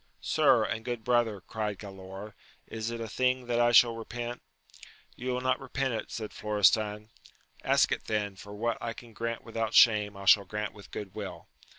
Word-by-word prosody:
Sir, 135 -7 +4
and 110 +1 -3
good 120 -2 -4
brother, 115 -4 +1
cried 105 0 -4
Galaor, 95 +1 -9 0.3
is 110 0 -4
it 115 0 -5
a 115 - -4
thing 130 +3 0
that 120 -1 0
I 120 0 +4
shall 120 -1 +6
repent? 120 +1 -6 0.7
You 125 +1 -5
will 125 0 -1
not 130 0 +1
repent 135 -1 -2
it, 110 - -4
said 110 -2 -6
Florestan. 105 +1 +1 0.3
— - - -29
^Ask - - +3
it - - -2
then; 105 -2 -1
for 100 +1 -10
what 115 +2 -1
I 115 -1 -3
can 115 -1 -13
grant 115 +1 -4
without 115 -1 -3
shame, 105 -4 +5
I 100 - -8
shall 100 +1 +6
grant 105 +2 -4
with 105 -1 -14
good 100 -3 -7
will. - - -7
110 Hz, 195 wpm, -29 LUFS, 105-120 Hz, 0.7 s, shall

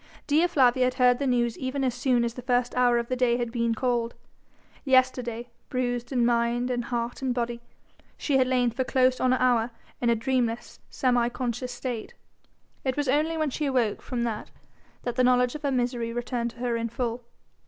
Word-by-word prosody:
Dea 310 +4 +3
Flavia 260 -6 +3
had 255 0 0
heard 250 -1 +4
the 280 - 0
news 240 -2 +1
even 265 +1 -2
as 255 -2 +1
soon 245 -1 +1
as 235 -1 -1
the 250 - -8
first 245 -1 0
hour 245 -1 +3
of 235 0 -1
the 255 - -1
day 245 -1 +2
had 240 -1 -2
been 230 -1 0
called. 240 -1 -1 0.7
Yesterday, 255 -3 +1 0.2
bruised 245 -1 -2
in 245 -3 +2
mind 240 +1 +1
and 245 -1 -2
heart 240 0 -3
and 255 -2 -1
body, 235 -1 -2 0.6
she 280 -3 +1
had 260 -1 +3
lain 250 -2 +2
for 260 +3 -1
close 255 -1 +2
on 255 - +2
an 255 - +2
hour 245 -2 +3 0.3
in 240 - +2
a 235 - +4
dreamless, 240 -1 -1
semi 245 -2 +1
conscious 250 0 -3
state. 240 -2 -5 0.7
It 260 0 -1
was 290 -1 0
only 305 +5 +1
when 310 -3 0
she 295 +2 -2
awoke 245 -6 0
from 245 -2 -3
that 225 -3 -3 0.5
that 245 0 -3
the 255 - +4
knowledge 250 0 +3
of 300 - -7
her 285 -2 0
misery 245 -2 -1
returned 240 0 -2
to 240 - -17
her 245 -2 0
in 230 0 -2
full. 235 +1 -3
245 Hz, 205 wpm, -26 LUFS, 235-255 Hz, 0.7 s, heard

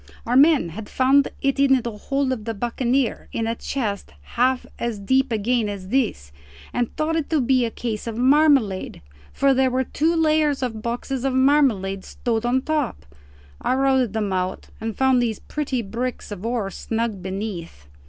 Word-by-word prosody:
Our 240 - 0
men 285 - +5
had 205 +6 -8
found 270 +2 +4 0.2
it 275 0 +1
in 270 -1 +5
the 235 - -3
hold 275 +5 -1
of 220 -4 -6
the 225 -1 -3
buccaneer 240 +3 -1
in 225 - -2
a 225 - 0
chest 225 - -4 0.2
half 255 +1 +2
as 235 -2 -2
deep 260 +6 +1
again 225 0 +1
as 190 -2 -6
this, 215 - 0 0.4
and 245 -1 -1
thought 315 +1 0
it 320 -3 -1
to 315 - +2
be 255 -1 +2
a - - -1
case 225 -1 -4
of 225 -1 -4
marmalade, 265 - +3 0.3
for 275 0 +3
there 265 0 +3
were 255 +1 0
two 320 +6 0
layers 310 -3 +2
of 225 -3 -3
boxes 245 +3 -3
of 270 -1 0
marmalade 260 -9 +2
stowed 235 -1 -2
on 260 +2 +1
top. 300 - -2 0.6
I 255 - +1
routed 265 -4 +2
them 210 -3 -1
out 185 0 -3
and 225 -1 -4
found 265 -2 +3
those 225 -3 -1
pretty 275 -5 -3
bricks 235 +4 -4
of 200 -2 -7
ore 230 -5 -2
snug 225 -3 -3
beneath. 185 - -6
245 Hz, 180 wpm, -23 LUFS, 215-270 Hz, 0.6 s, men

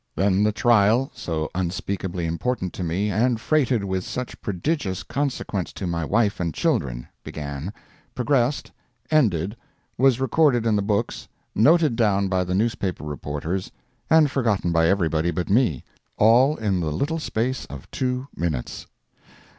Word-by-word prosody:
Then 95 +2 +2
the 105 +1 +3
trial 115 +4 +3
so 80 -10 -3
unspeakably 90 0 -3
important 90 +4 -2
to 90 - -5
me, 95 +5 -1
and 115 +3 +1
freighted 130 -5 +1
with 95 -1 -2
such 125 +5 -6
prodigious 100 - -2
consequence 130 -9 -2
to 95 - -5
my 85 -1 -1
wife 105 +5 +1
and 85 -4 -2
children, - - -1 0.2
began, 70 +4 -5 0.4
progressed, 130 +1 +1 0.4
ended, 105 - +2 0.4
was 130 -1 +4
recorded 135 -2 +3
in 110 -2 +3
the 100 - +2
books, 105 +2 -1 0.3
noted 150 +2 +4
down 100 -4 +2
by 95 -1 +1
the 90 0 -2
newspaper 100 -5 -1
reporters, 75 +5 -4 0.4
and 160 -3 +5
forgotten 110 -10 +1
by 80 0 +3
everybody 85 -3 +1
but 90 +2 -2
me—all 115 - +2
in 100 -7 -1
the 80 -3 -1
little 150 - -1
space 130 -2 -2
of 70 -1 -9
two 125 +1 -2
minutes! 80 -8 -3
100 Hz, 140 wpm, -24 LUFS, 85-125 Hz, 0.4 s, and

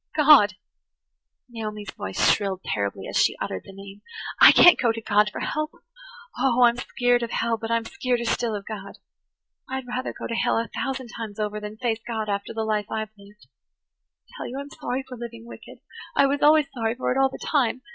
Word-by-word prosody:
[Page 300 - +2
106] 255 -9 +8
"God!" - - -26 0.9
Naomi's 215 -4 -6
voice 95 - +1
shrilled 195 -2 -3
terribly 100 -1 -2
as - - -2
she - - +2
uttered 95 - -4
the - - -11
name. 195 +1 -12 0.4
"I - - +11
can't 355 - +7
go 240 -3 +3
to 225 - -5
God 210 -1 +2
for - - -6
help. 305 0 -2 0.7
Oh, 250 -2 +3
I'm 240 0 +5
skeered 245 0 +1
of 235 - -3
hell, 230 +1 0
but 225 0 -6
I'm 230 0 +1
skeereder 245 -1 -2
still 230 -1 0
of 200 -1 -6
God. 200 -3 -8 0.7
I'd 265 0 -4
rather 250 +1 -3
go - - -8
to - - -4
hell 230 - +1
a 230 0 -2
thousand 265 -2 -3
times 220 -3 -7
over 210 0 -2
than 210 +1 -8
face 230 -2 -1
God 220 -2 -3
after 200 0 -3
the 225 -1 -3
life 210 -1 -1
I've 220 -1 -4
lived. 205 +1 -18 0.8
I - - -32
tell - - -6
you 255 - -6
I'm 280 0 -8
sorry 255 +2 -4
for 250 - -8
living 235 -1 -8
wicked–I 235 - -4
was 280 +1 0
always 305 0 +6
sorry 225 -2 -1
for 255 - -2
it 255 - 0
all 270 0 +4
the - - -8
time. 255 -3 0
230 Hz, 210 wpm, -24 LUFS, 210-255 Hz, 0.9 s, I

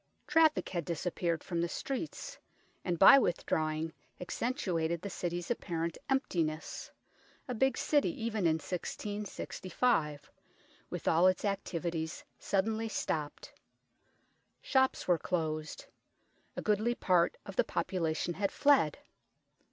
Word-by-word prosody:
Traffic 315 0 +3
had 175 -2 -2
disappeared 170 0 -2
from 170 -2 -2
the 170 - 0
streets, 275 - -5 0.4
and 175 -2 -1
by 195 +10 +9
withdrawing 160 -5 0 0.3
accentuated 180 - -1
the 200 - -4
city's 175 +3 -3
apparent 170 -7 -2
emptiness 165 - -1 0.6
a 250 - -2
big 265 +3 +2
city 295 +1 +2
even 225 - -1
in 160 - +3
1665, 185 - -2 0.6
with - - -5
all 170 +3 +5
its 185 +2 +2
activities 170 -5 -2
suddenly 220 +3 0
stopped. 150 -7 -3 1.1
Shops 265 -1 +1
were 175 -2 +4
closed. 155 -3 -2 0.7
A - - -3
goodly 215 +3 +2
part 180 -5 +2
of - - -8
the - - +4
population 170 -2 -1
had 195 +2 -1
fled. 280 - +4
180 Hz, 115 wpm, -32 LUFS, 165-225 Hz, 1.1 s, by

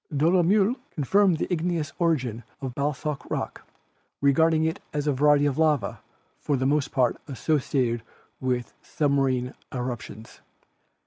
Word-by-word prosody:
Dolo 170 +5 +4
mieu 205 +7 +3 0.2
confirmed 185 +4 +3
the - - -1
igneous 165 -3 -1
origin 130 -9 0 0.2
of 135 -3 -5
basalt 145 +1 -2
rock, - - -4 0.5
regard 160 +4 +4
ing 160 0 +2
it 160 - -1
as 145 -1 -1
a 145 - +2
variety 145 +2 +4
of 145 0 0
lava 150 -8 +1 0.4
for 145 - 0
the 130 - -1
most 145 0 +1
part 125 -3 +2
associated 130 -4 0 0.4
with 125 -2 -2
submarine 135 -5 0 0.2
eruptions. 120 -3 -6
145 Hz, 135 wpm, -26 LUFS, 130-160 Hz, 0.5 s, Dolo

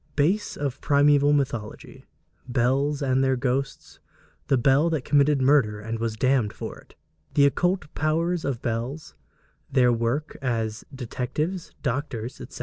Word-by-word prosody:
Base 180 +9 +1
of 140 -3 -2
the - - -28
Primeval 145 0 +4
Mythology 130 -7 -3 0.4
Bells 135 +4 +1
and 130 0 +2
their 130 0 +2
Ghosts 130 +2 -3 0.5
The 135 - +3
Bell 135 +6 +3
that 155 -5 -2
committed 145 -1 +3
Murder 130 -7 +3
and 110 +2 -5
was 115 -1 -2
damned 125 -2 +1
for - - -7
it - - -20 0.4
The 140 - +6
Occult 175 +2 0
Powers 165 +3 0
of 130 -4 -3
Bells 120 +6 -3 0.6
Their 125 -2 +4
Work 120 +6 -2
as 115 -4 -2
Detectives, 140 +7 -4
Doctors, 125 -3 -3
etc. - - -9
135 Hz, 145 wpm, -25 LUFS, 120-145 Hz, 0.6 s, The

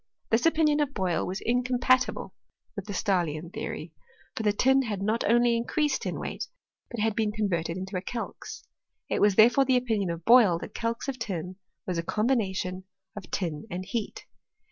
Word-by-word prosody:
This 230 +7 +4
opinion 310 -2 +3
of 285 -2 -1
Boyle 185 -4 0
was 190 +1 -4
incompatible 250 +1 +1 0.4
with 200 -3 -5
the 210 - -6
Stah 195 -2 +1
lian 155 +1 -5
theory: - - -5 0.4
for - - -2
the 210 -1 +3
tin 265 +6 +3
had 215 -6 -3
not 215 +4 0
only 240 0 +4
increased 275 +5 0
in - - -3
weight, - - -4 0.4
but 240 - -6
had 220 0 +1
been 215 -2 +1
converted 180 -6 -1
into 190 +1 -6
a 180 - -1
calx. 230 +5 -6 0.5
It - - +1
was 205 -2 +4
therefore 240 +6 +6
the 260 -1 +4
opinion 220 -7 0
of 170 0 -5
Boyle 225 -8 +6
that - - -8
calx 230 +2 -3
of 265 -2 -3
tin 185 -4 -4 0.3
was 180 -2 -2
a - - -2
combination 190 -4 -1 0.3
of 200 -4 -8
tin 160 -5 -3
and 180 +2 -5
heat. 215 +2 -4
215 Hz, 185 wpm, -27 LUFS, 185-245 Hz, 0.5 s, therefore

